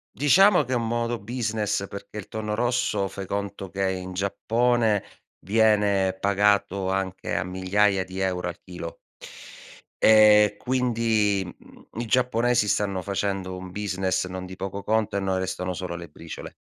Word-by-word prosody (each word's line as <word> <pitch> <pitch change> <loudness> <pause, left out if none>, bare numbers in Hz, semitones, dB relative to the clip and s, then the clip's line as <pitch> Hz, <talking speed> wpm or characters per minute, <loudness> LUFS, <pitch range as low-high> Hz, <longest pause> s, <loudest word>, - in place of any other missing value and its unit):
Diciamo 180 +5 +5
che 130 - -6
è - - +3
un 115 -1 -1
modo 120 0 -1
business, 105 -3 -2
perché 100 +2 -9
il 100 - -7
tonno 105 -1 -4
rosso 120 -4 0
fai 95 0 -7
conto 100 0 -4
che 95 0 -1
in 95 0 -5
Giappone 110 +3 +1 0.3
viene 100 -2 +2
pagato 100 -1 +1
anche 95 -1 -2
a 85 - -1
migliaia 95 +2 +1
di 95 0 -9
euro 90 -2 -1
al 90 - -7
chilo. 90 -2 -8 1.0
E 105 -1 +7
quindi, 115 -6 +1
mhmm, 85 - -15
i 120 - -3
giapponesi 120 -2 +2
stanno 100 -3 0
facendo 95 -1 -2
un 90 0 -8
business 95 -2 -1
non 95 0 -6
di 95 0 -9
poco 95 +1 -5
conto, 110 -2 0
e - - +2
a - - -3
noi 95 -1 0
restano 95 -1 -3
solo 85 +1 -5
le 85 -1 -8
briciole. 80 +2 -9
100 Hz, 160 wpm, -25 LUFS, 95-110 Hz, 1.0 s, E